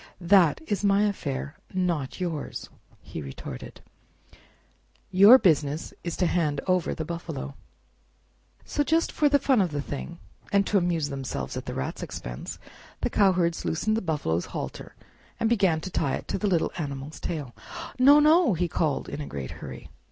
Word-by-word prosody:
"That 175 -4 +4
is 205 -5 -2
my 200 0 +4
affair, 145 -8 -3 0.2
not 170 -7 -1
yours," 170 -5 -4 0.3
he - - -7
retorted; 65 -2 -8 1.3
"your 200 +7 +9
business 155 - +1
is 170 - -4
to 180 - +2
hand 155 -5 +1
over 185 -2 +1
the 160 - -4
buffalo." 160 -4 -5 1.1
So 290 - 0
just 325 +3 +1
for 295 - +3
the 285 - +5
fun 270 -4 +3
of 185 - +1
the 145 -2 -3
thing, 145 +4 -5 0.3
and 200 -1 +3
to 200 - +3
amuse 170 -4 0
themselves 130 - -4
at - - -6
the - - -4
Rat's 65 - -4
expense, - - -6 0.4
the - - 0
cowherds 180 -4 +2
loosened 215 +7 0
the 225 - 0
buffalo's 145 - -1
halter - - -6 0.4
and 225 - +2
began 195 -8 +3
to 185 - -6
tie 140 -6 0
it - - -7
to - - -1
the 210 - 0
little 175 -4 +1
animal's 140 -1 -5
tail. 145 -8 -4 0.5
"No! 285 +3 +8
no!" 305 - +5
he 175 +2 0
called, 155 -3 -1
in 150 - -5
a 145 - -5
great 70 -3 -6
hurry. 65 -1 -9
170 Hz, 165 wpm, -26 LUFS, 145-200 Hz, 1.3 s, your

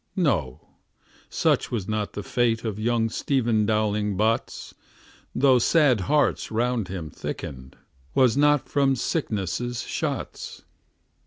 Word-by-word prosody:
No; 90 - 0 0.7
such - - +1
was 105 -6 -3
not 110 -1 -2
the 105 - -5
fate 115 +1 0
of 110 -2 -3
Young 115 0 +1
Stephen 115 -3 0
Dowling 105 -2 0
Bots; 110 +2 -1 0.6
Though 130 -1 +4
sad 140 -2 +4
hearts 150 0 +2
round 120 -2 0
him 90 -5 -6
thickened, 65 0 -7 0.4
'Twas 130 -3 +4
not 145 0 +3
from 140 -2 +2
sickness' 120 - -2
shots. - - -5
115 Hz, 115 wpm, -25 LUFS, 105-130 Hz, 0.7 s, Though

